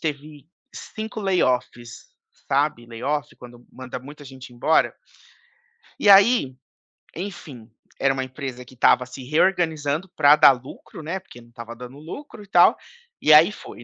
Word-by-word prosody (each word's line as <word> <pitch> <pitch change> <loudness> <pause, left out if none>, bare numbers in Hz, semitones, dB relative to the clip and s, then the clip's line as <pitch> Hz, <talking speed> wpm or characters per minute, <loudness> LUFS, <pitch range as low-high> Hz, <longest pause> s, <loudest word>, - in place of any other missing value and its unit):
teve 150 -1 -6 0.3
5 220 0 -7
layoffs, 125 - -2 0.4
sabe, 135 -4 0
layoff 140 +6 -4
quando 120 -1 -14
manda 130 0 -8
muita 145 +3 -13
gente 130 -2 -12
embora? 140 +7 +1 1.0
E, 205 - 0
aí, 200 - +5 0.6
enfim, 160 - -9 0.3
era 135 - +2
uma 135 -1 -3
empresa 130 -1 -7
que 130 - -17
estava 125 +1 +3
se 125 +1 -11
reorganizando 160 +1 0
para 145 -1 +6
dar 150 -2 +7
lucro, 130 +4 -12
né, 170 +5 -4
porque 120 -10 -16
não 120 - -20
estava 120 0 -10
dando 125 +3 -11
lucro 215 - -10
e - - -18
tal, 175 -2 +5 0.5
e 155 - +5
aí 160 +6 +7
foi, 120 - -12
140 Hz, 150 wpm, -22 LUFS, 125-165 Hz, 1.0 s, dar